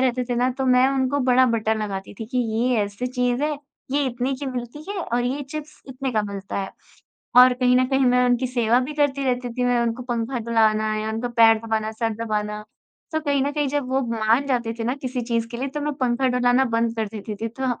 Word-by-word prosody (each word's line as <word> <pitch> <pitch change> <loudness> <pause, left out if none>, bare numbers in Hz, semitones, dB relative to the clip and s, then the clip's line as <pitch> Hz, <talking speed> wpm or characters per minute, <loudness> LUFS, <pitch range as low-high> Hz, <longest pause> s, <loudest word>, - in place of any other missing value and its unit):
रहते 255 -1 +1
थे - - +1
ना 250 +1 +2
तो 265 - 0
मैं 255 0 +5
उनको 270 +1 0
बड़ा 255 +1 +5
बटर 220 -2 +1
लगाती 195 -2 -5
थी 225 - -5
कि 250 +2 -2
ये 240 +1 +1
ऐसी 205 +4 -4
चीज़ 250 +1 0
है, 300 -1 -1 0.3
ये 285 +1 +1
इतने 250 +1 -2
की 275 +2 -6
मिलती 255 +3 -6
है 405 - -3
और 240 -3 -1
ये 270 +4 -2
चिप्स 305 0 -7
इतने 265 0 -4
का 215 - +1
मिलता 200 -1 -6
है। 195 - -5 0.7
और 250 0 +9
कहीं 250 0 +2
न 255 - +4
कहीं 270 0 +2
मैं 250 0 +4
उनकी 245 +1 +2
सेवा 240 -1 +2
भी 260 +4 -4
करती 285 -2 +1
रहती 250 -1 0
थी, 250 0 -1
मैं 245 0 +2
उनको 235 +1 -2
पंखा 240 +1 -2
ढुलाना 215 -2 +2
या 215 0 -2
उनका 225 +2 -2
पैर 225 -1 +7
दबाना, 220 -1 -2
सर 225 +1 -1
दबाना। 210 -1 -2 0.5
तो 315 - 0
कहीं 285 -3 +1
न 280 - 0
कहीं 295 -1 0
जब 285 -2 -2
वो 265 +1 +2
मान 225 +5 +2
जाते 240 -4 0
थे 225 - -3
ना 245 +3 0
किसी 255 -1 -2
चीज़ 230 -1 -1
के 235 - -6
लिए 265 +3 -3
तो 295 - -2
मैं 295 +1 -1
पंखा 255 +1 +1
ढुलाना 250 +1 +3
बंद 230 0 +1
कर 220 -1 -1
देती 215 0 -6
थी, 225 +3 -4
तो 260 +4 -4
245 Hz, 240 wpm, -23 LUFS, 225-265 Hz, 0.7 s, और